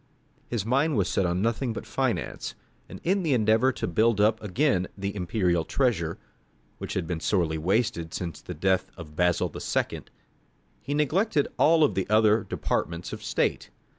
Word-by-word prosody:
His 115 -5 -2
mind 135 +4 +2
was 95 -3 +2
set 95 - +1
on 90 +3 0
nothing 115 +1 0
but - - -6
finance, - - -2 0.3
and - - -9
in 190 +3 +2
the 155 -7 +2
endeavour 110 +3 +3
to - - -3
build 110 +5 +2
up 110 +1 +3
again 105 -2 +1
the 100 +1 -3
imperial 90 -3 0
treasure, 85 - 0 0.6
which - - -5
had 90 - -1
been 85 -1 -3
sorely 80 -4 0
wasted 90 -1 0
since 85 -4 -5
the 90 - -7
death 95 +3 +1
of 75 -4 -10
Basil 90 0 +1
II., - - -2 0.8
he 145 +3 -3
neglected 150 - +1
all 160 -1 +5
the 95 -8 -3
other 110 0 +4
departments 85 +1 -3
of - - -6
state. - - -1
105 Hz, 165 wpm, -27 LUFS, 90-125 Hz, 0.8 s, all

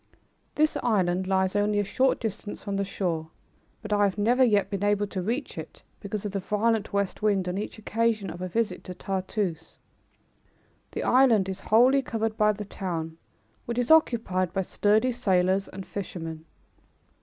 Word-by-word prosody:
This 310 0 +2
island 185 -5 +1
lies 190 0 +1
only 205 0 +2
a 205 - +2
short 260 +6 +1
distance 215 -2 -5
from 200 -1 -3
the 200 - +1
shore, 170 -5 -3 0.5
but 210 -1 -2
I 205 0 +4
have 195 0 -1
never 240 +5 +3
yet 210 -5 +3
been 200 0 -2
able 205 0 +2
to 195 -2 -4
reach 235 +10 -3
it - - -10 0.2
because 205 0 -5
of 205 - -2
the 200 - -2
violent 215 +2 0
west 200 -2 -1
wind 200 -3 +1
on 180 +2 -2
each 210 - -5
occasion 220 -1 0
of 175 - -9
a 185 - -2
visit 195 -1 -1
to 180 - -7
Tartoose. 185 -3 -3 1.2
The - - -3
island 245 -7 +4
is 190 0 -4
wholly 250 +7 +4
covered 225 -3 -2
by 210 -1 +4
the 210 0 -6
town, 165 -4 -5 0.5
which 235 0 -3
is 245 +3 +1
occupied 225 - +3
by 195 - 0
sturdy 215 +7 +2
sailors 190 -4 +1
and 190 0 -8
fishermen. 165 -5 -6
205 Hz, 175 wpm, -27 LUFS, 185-220 Hz, 1.2 s, I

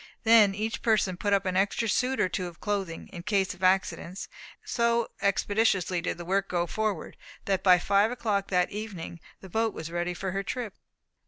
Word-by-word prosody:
Then 220 -3 +6
each 220 +2 -3
person 215 -5 +2
put 205 +3 -2
up 200 -1 +2
an 185 -1 -1
extra 200 +4 +1
suit 255 +5 +1
or - - +3
two 180 0 -3
of 170 -1 -11
clothing, 195 -5 -3
in 175 - -8
case 195 0 0
of - - -18
accidents. 185 -1 +1 0.4
And - - -24
so 235 -1 +1
expeditiously 200 -3 +1
did 180 - -2
the 175 - -7
work 195 +2 0
go 175 -1 0
forward, 210 -1 -3 0.3
that 195 -2 +1
by 185 -2 +6
five 200 +4 +3
o'clock 215 -5 -1
that 180 -1 +1
evening 195 -6 -6 0.2
the 190 - -10
boat 225 +3 0
was 160 +1 -6
ready 175 +1 -2
for 190 +1 -3
her 195 +1 -1
trip. 230 0 -4
195 Hz, 195 wpm, -28 LUFS, 180-215 Hz, 0.4 s, Then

